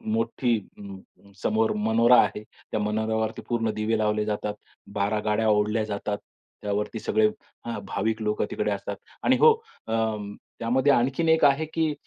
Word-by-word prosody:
मोठी 130 - +1 0.2
अं, 100 0 -12
समोर 110 0 +2
मनोरा 115 +2 +5
आहे. 105 - -3 0.3
त्या 110 - 0
मनोऱ्यावरती 110 +1 -1
पूर्ण 115 -2 0
दिवे 110 +1 0
लावले 105 0 +1
जातात. 105 0 -2 0.4
12 100 +2 +1
गाड्या 110 +1 +2
ओढल्या 105 +1 +2
जातात. 105 0 -3 0.5
त्यावरती 105 +2 -2
सगळे 110 0 +2 0.4
हा 115 - -3
भाविक 110 +2 -1
लोकं 105 0 0
तिकडे 105 0 -1
असतात 100 0 -3 0.3
आणि 260 0 +4
हो 465 - +8 0.4
अ, 110 - -2 0.7
त्यामध्ये 130 +4 +2
आणखीन 135 +7 +1
एक 160 0 +4
आहे 140 +3 +4
की 160 -2 +1
110 Hz, 150 wpm, -26 LUFS, 105-120 Hz, 0.7 s, हो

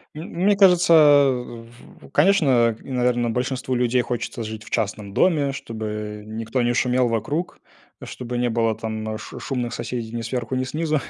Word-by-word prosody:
М 155 - -7 0.2
мне 205 -1 +4
кажется, 180 -3 +5 1.1
в - - -15
конечно, 140 - +3
наверное, 125 -2 0
большинству 125 +2 -2
людей 125 0 +2
хочется 120 -1 -4
жить 110 0 -7
в - - -13
частном 105 -2 -2
доме, 145 - +2
чтобы 105 -3 -6
никто 115 +3 -3
не 120 0 +1
шумел 125 0 +2
вокруг, 120 - -2 0.4
чтобы 125 -1 -6
не 120 0 +1
было, 115 -1 +1
там 110 0 -4
ш 125 - -9
шумных 125 -1 -3
соседей 115 -3 -5
ни 115 0 -4
сверху, 120 +2 -3
ни 130 0 -1
снизу, 155 +1 -1
120 Hz, 155 wpm, -22 LUFS, 110-135 Hz, 1.1 s, кажется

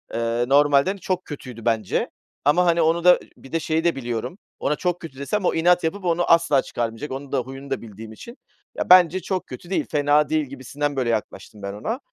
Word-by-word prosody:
ııı, 115 +2 -1
normalden 145 +6 +4
çok 185 -1 -3
kötüydü 125 -6 -9
bence. 110 -4 0 0.4
Ama, 175 +5 +4
hani, 170 -1 +3
onu 165 +2 +2
da 180 0 +7
Eee, - - -17
bir 135 - -15
de 165 - 0
şeyi 160 +1 -1
de 170 -3 +2
biliyorum, 120 - -4 0.2
ona 150 - 0
çok 175 +1 -2
kötü 140 -5 -10
desem 190 +7 -2
o - - +2
inat 175 +2 +3
yapıp 185 +4 -3
onu 175 0 +1
asla 165 -5 +4
çıkarmayacak, 115 +4 -4
onun 135 +1 -6
da 135 - +1
huyunu 135 +2 -8
da 135 - -2
bildiğim 110 0 -10
için. 235 - -11 0.4
Ya, - - -3
bence 180 0 +7
çok 185 0 -3
kötü 150 +8 -10
değil, 195 - 0
fena 145 0 +3
değil 155 -2 +1
gibisinden, 140 +2 -4
böyle, 125 -3 0
yaklaştım 105 -1 -4
ben 100 0 -5
ona. 225 - -4
145 Hz, 215 wpm, -23 LUFS, 125-170 Hz, 0.4 s, da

